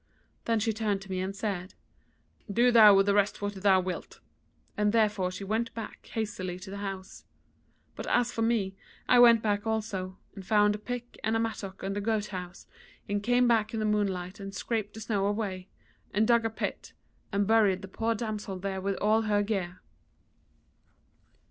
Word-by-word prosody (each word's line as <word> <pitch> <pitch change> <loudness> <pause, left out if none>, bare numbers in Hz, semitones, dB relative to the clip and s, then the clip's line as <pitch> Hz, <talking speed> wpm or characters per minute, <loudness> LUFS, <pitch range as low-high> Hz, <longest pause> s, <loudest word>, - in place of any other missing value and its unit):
Then 230 -1 +2
she 225 +1 0
turned 210 -2 -1
to 195 - -11
me 185 - -1
and 190 +1 -3
said: 200 -3 -4 0.8
'Do 240 +4 +4
thou 215 -4 +8
with 195 0 +5
the 200 - +3
rest 205 0 +2
what 205 0 -3
thou 190 -1 +3
wilt,' 185 0 -5 0.6
and 210 0 +1
therewith 210 -5 +2
she - - -6
went 220 +4 -1
back 225 -2 -8
hastily 190 -5 -3
to 190 +1 -10
the 200 - -6
house. 195 -2 -6 0.7
But - - -6
as 240 -1 +2
for 225 - -3
me, 220 -4 +1 0.3
I 250 - +6
went 235 -2 +7
back 205 0 0
also, 205 -4 -2 0.2
and 195 - -9
found 210 +1 +3
a 210 - -5
pick 245 +2 -6
and 220 +1 +1
a - - +2
mattock 210 -4 -4
in 195 +1 -2
the 205 - -2
goat 210 0 -1
house, 180 -1 -7 0.4
and 205 0 -1
came 245 +3 +3
back 225 -1 +2
in - - -1
the 215 - 0
moonlight 200 -2 -1
and 195 0 -7
scraped 215 -3 -3
the 220 - -8
snow 200 -3 0
away, 200 -3 -3 0.4
and 215 +2 +2
dug 235 -1 +4
a - - +1
pit, 220 - -5 0.4
and 200 0 +1
buried 205 -3 +3
the - - -6
poor 225 +4 -1
damsel 210 -3 -4
there 190 0 -4
with 195 +1 -1
all 215 +3 +2
her 210 -2 +1
gear. 190 -4 -3
205 Hz, 190 wpm, -29 LUFS, 195-225 Hz, 0.8 s, thou